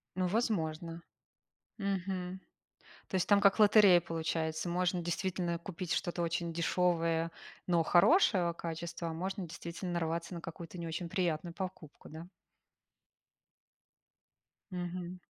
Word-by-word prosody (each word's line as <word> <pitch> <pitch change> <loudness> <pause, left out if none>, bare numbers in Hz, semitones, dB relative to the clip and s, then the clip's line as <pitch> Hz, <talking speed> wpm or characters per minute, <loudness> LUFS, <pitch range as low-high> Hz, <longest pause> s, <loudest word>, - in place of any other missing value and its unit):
Ну, 185 0 +1
возможно. 170 -6 -1 0.8
Мгм. 190 -2 -2 0.7
То - - -4
есть 185 - +1
там 200 -1 +5
как 200 +2 +5
лотерея 205 -4 +7
получается. 160 0 -2
Можно 180 0 +1
действительно 175 0 -1
купить 180 -1 -4
что-то 175 -1 -1
очень 170 0 -1
дешевое, 165 -1 +1 0.4
но 170 -2 +3
хорошего 180 - +4
качества, 170 0 -5
а - - -4
можно 185 +2 -3
действительно 170 +2 -6
нарваться 170 +1 -2
на 170 - -5
какую-то 170 +1 -8
не 170 -1 -4
очень 165 +1 -4
приятную 170 -2 -1
покупку, 185 -5 -7
да. 160 +2 -9 2.4
Мгм. 180 0 -5
175 Hz, 115 wpm, -33 LUFS, 165-185 Hz, 2.4 s, лотерея